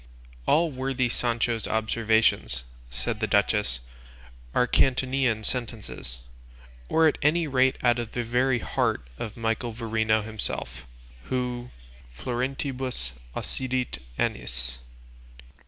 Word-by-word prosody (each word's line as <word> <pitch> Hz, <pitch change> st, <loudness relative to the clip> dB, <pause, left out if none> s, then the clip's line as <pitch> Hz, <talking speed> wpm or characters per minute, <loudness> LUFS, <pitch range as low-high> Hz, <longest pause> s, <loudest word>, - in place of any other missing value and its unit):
"All 165 Hz, +1 st, +4 dB
worthy 130 Hz, -1 st, 0 dB
Sancho's 115 Hz, -1 st, 0 dB
observations," 110 Hz, -, +2 dB, 0.3 s
said 105 Hz, -, -2 dB
the 110 Hz, -, +1 dB
duchess, 100 Hz, -, +2 dB, 0.7 s
"are 125 Hz, -, +5 dB
Catonian 130 Hz, -3 st, +2 dB
sentences, 110 Hz, -, -4 dB, 0.7 s
or 160 Hz, 0 st, +5 dB
at 155 Hz, -, +1 dB
any 160 Hz, +3 st, +4 dB
rate 130 Hz, -2 st, +3 dB
out 120 Hz, -1 st, +4 dB
of 120 Hz, -2 st, -4 dB
the 120 Hz, -, 0 dB
very 125 Hz, +2 st, +2 dB
heart 85 Hz, -, 0 dB
of 110 Hz, -1 st, -5 dB
Michael 115 Hz, +1 st, 0 dB
Verino 110 Hz, -1 st, +1 dB
himself, 65 Hz, -, -4 dB, 0.4 s
who 125 Hz, -1 st, -2 dB, 0.4 s
florentibus 125 Hz, -, -2 dB, 0.2 s
occidit 130 Hz, -, -2 dB, 0.2 s
annis. 60 Hz, -1 st, -2 dB
120 Hz, 105 wpm, -27 LUFS, 110-130 Hz, 0.7 s, are